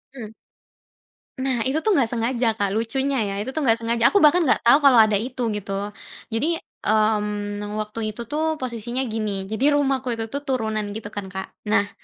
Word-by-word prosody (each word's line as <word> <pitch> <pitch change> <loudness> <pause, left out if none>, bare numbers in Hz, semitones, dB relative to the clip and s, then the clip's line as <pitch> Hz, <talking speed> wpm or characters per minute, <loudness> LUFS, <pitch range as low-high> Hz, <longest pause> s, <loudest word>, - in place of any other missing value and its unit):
Hmm. 220 -3 -8 1.1
Nah, 260 -3 0
itu 290 +5 0
tuh 430 -4 +2
nggak 245 -5 +2
sengaja, 235 0 0
Kak. 205 -2 -1
Lucunya 265 +4 0
ya, 195 - -3
itu 225 - -4
nggak 235 -7 +3
sengaja. 230 0 0
Aku 405 - +4
bahkan 325 +3 +5
nggak - - +3
tahu 240 +4 +6
kalau 260 -4 +7
ada 215 -2 +3
itu, 245 +1 -3
gitu. 200 -1 -3 0.4
Jadi, 300 +9 0 0.2
mmm, 210 -1 0
waktu 215 0 -4
itu 235 - -8
tuh 315 +1 0
posisinya 240 0 -3
gini. 205 -3 -3
Jadi 265 +7 +2
rumahku 270 -3 +1
itu 225 -1 -5
tuh 285 +3 -5
turunan 220 -6 -1
gitu 210 -1 -6
kan, 205 -2 -6
Kak. 190 0 -5 0.2
Nah, 205 -1 +2
230 Hz, 180 wpm, -23 LUFS, 210-265 Hz, 1.1 s, kalau